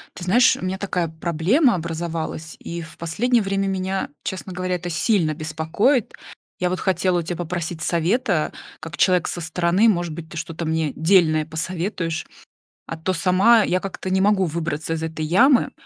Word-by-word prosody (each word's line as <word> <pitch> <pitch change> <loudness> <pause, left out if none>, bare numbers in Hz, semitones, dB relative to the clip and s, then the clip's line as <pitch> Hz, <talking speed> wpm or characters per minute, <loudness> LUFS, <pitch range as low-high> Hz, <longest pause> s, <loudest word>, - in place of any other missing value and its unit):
Ты 175 - -7
знаешь, 240 +8 +5
у - - -9
меня 185 +1 -2
такая 185 -3 -1
проблема 170 - +2
образовалась, 165 -2 -4
и 170 0 -6
в 160 -1 -11
последнее 230 +9 +1
время 195 0 -1
меня, 190 0 -2
честно 190 0 -5
говоря, 185 0 -2
это 175 0 -5
сильно 170 -2 +1
беспокоит. 160 - 0 0.5
Я 180 - +1
вот 185 - -2
хотела 185 -1 +1
у - - -1
тебя 175 +1 -4
попросить 170 -1 -4
совета, 175 +1 +1 0.3
как 165 +1 -8
человек 180 -3 +3
со 175 - -3
стороны, 170 +6 +2
может 175 -5 0
быть, 160 0 -8
ты 165 - -9
что-то 165 0 -5
мне 160 -1 -1
дельное 160 -2 +3
посоветуешь? 165 +1 -3 0.6
А 165 - -6
то 175 +4 -1
сама 195 +6 +4
я 185 -1 +1
как-то 190 0 -6
не 190 0 +2
могу 200 -1 +3
выбраться 165 -1 -3
из 160 - -3
этой 160 -1 -4
ямы. 240 - +4
175 Hz, 175 wpm, -22 LUFS, 160-190 Hz, 0.6 s, знаешь